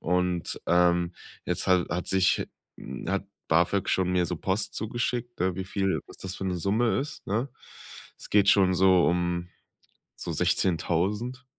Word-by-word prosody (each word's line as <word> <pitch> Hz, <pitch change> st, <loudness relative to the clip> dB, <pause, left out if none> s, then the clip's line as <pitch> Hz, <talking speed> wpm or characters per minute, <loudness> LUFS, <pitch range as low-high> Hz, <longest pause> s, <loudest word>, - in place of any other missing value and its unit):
Und, 90 Hz, 0 st, -1 dB
ähm, 85 Hz, 0 st, +3 dB, 0.3 s
jetzt -, -, -1 dB
ha 90 Hz, -2 st, +4 dB
hat 90 Hz, +1 st, -2 dB
sich 95 Hz, -1 st, +2 dB, 0.3 s
hm, 65 Hz, -, -8 dB
hat 100 Hz, 0 st, -1 dB, 0.2 s
BAföG 85 Hz, +4 st, +2 dB
schon 95 Hz, -1 st, +1 dB
mir 90 Hz, -1 st, +2 dB
so 90 Hz, -, -3 dB
Post 95 Hz, +6 st, -1 dB
zugeschickt, 120 Hz, 0 st, -3 dB
äh, 90 Hz, -1 st, +1 dB
wie 95 Hz, -, -3 dB
viel 95 Hz, 0 st, -1 dB
was -, -, -13 dB
das 95 Hz, 0 st, -6 dB
für 95 Hz, -, -5 dB
'ne 90 Hz, -1 st, -1 dB
Summe 105 Hz, +7 st, +1 dB
ist, 145 Hz, +2 st, -7 dB
ne? 115 Hz, +7 st, -1 dB, 0.7 s
Es -, -, -11 dB
geht 100 Hz, -1 st, +4 dB
schon 95 Hz, -3 st, +5 dB
so 95 Hz, -1 st, +5 dB
um 85 Hz, 0 st, 0 dB, 0.7 s
so -, -, -5 dB
16.000, 100 Hz, +9 st, 0 dB
95 Hz, 160 wpm, -27 LUFS, 90-100 Hz, 0.7 s, schon